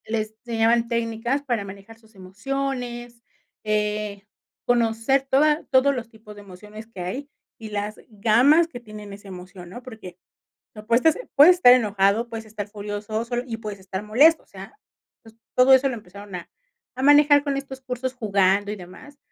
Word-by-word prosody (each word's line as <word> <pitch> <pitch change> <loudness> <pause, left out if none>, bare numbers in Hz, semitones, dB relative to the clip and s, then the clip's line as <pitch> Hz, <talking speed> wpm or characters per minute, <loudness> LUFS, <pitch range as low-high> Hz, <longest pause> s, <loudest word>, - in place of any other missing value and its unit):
Le 225 0 -1 0.3
enseñaban 230 0 +2
técnicas, 235 +3 -2
para 240 -7 -2
manejar 200 +3 -12
sus 220 -1 -25
emociones, 240 +4 -5 0.4
eh, 210 -1 -2 0.4
conocer 240 +3 +1
toda 300 +3 +3
todos 270 +1 +4
los 240 -2 -6
tipos 220 -2 -14
de 205 - -12
emociones 210 +3 -12
que 210 -5 -10
hay, 255 +11 -5 0.3
y 220 -1 -8
las 210 0 -4
gamas, 240 +10 +4
que 250 -7 -9
tienen 210 -3 -11
esa 200 0 -13
emoción, 180 -1 -11
¿no? 245 +7 -10
Porque, 215 -8 -11 0.6
no 210 -1 -11
pues 235 +2 +2
ta 320 - +6 0.2
Puedes 330 +6 +7
estar 250 -9 +7
enojado, 210 -1 +1
puedes 225 -1 -7
estar 210 -1 -7
furioso, 210 +1 -5
solo 240 0 -2
y 230 -3 -5
puedes 210 -3 -7
estar 190 +1 -6
molesto. 280 +10 +4
O - - -30
sea, 195 0 -12 0.5
pues, 225 -1 -17 0.2
todo 255 +1 +5
eso 265 +1 +5
lo 260 - -3
empezaron 200 -2 -11
a 175 -1 -7 0.5
a - - -3
manejar, 290 0 +6
con 280 -1 -1
estos 270 -1 -9
cursos 255 0 -4
jugando, 200 -3 +1
y - - -5
demás. 205 +11 -13
225 Hz, 175 wpm, -23 LUFS, 205-255 Hz, 0.6 s, Puedes